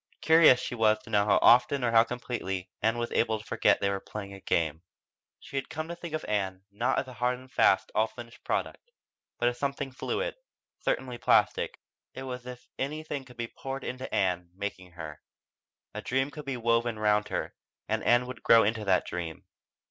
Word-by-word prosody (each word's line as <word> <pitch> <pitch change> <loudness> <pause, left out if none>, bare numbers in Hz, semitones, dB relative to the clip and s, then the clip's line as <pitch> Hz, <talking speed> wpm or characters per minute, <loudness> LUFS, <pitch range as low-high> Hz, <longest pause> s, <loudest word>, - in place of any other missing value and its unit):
Curious 160 -5 +7
she 125 - -4
was 110 -2 +3
to 110 - -12
know 100 -1 +3
how 105 - +4
often 125 +3 +6
or 120 - +2
how 115 0 +7
completely 115 -6 -4
Ann 110 +2 +2
was 120 0 -2
able 110 -1 +2
to 105 - -12
forget - - +3
they 100 - +2
were 100 - -2
playing 100 0 -7
a 100 - -9
game. 80 -3 0 0.6
She 140 - -7
had 135 - -3
come 155 +1 -4
to 170 - -4
think 170 -2 -6
of 155 - -4
Ann, 95 -3 -2
not 120 +6 0
as - - -1
a 130 - -9
hard 125 +1 0
and 130 +1 -15
fast, - - +3
all 110 +1 +3
finished 120 0 -12
product, 485 - -3 0.5
but 120 - +1
as 120 0 -1
something 140 -1 -2
fluid, - - -2 0.5
certainly 125 -2 -2
plastic. - - +2 0.4
It 130 - -6
was 125 -1 -6
as 125 - -4
if - - -29
anything 150 0 -3
could 125 -2 -16
be 120 - -2
poured 135 -4 -5
into 130 +1 -5
Ann, 90 -3 0
making 95 -3 -6
her. 80 -3 -8 0.7
A - - -5
dream 135 +2 0
could 150 -1 -8
be 135 -2 -3
woven 115 -1 +1
round 105 -1 +2
her, - - -3 0.3
and - - -1
Ann 120 +1 +4
could 125 -1 -8
grow 115 -1 +6
into 110 +1 0
that 95 -2 +2
dream. 85 -2 -5
120 Hz, 205 wpm, -29 LUFS, 105-130 Hz, 0.7 s, Curious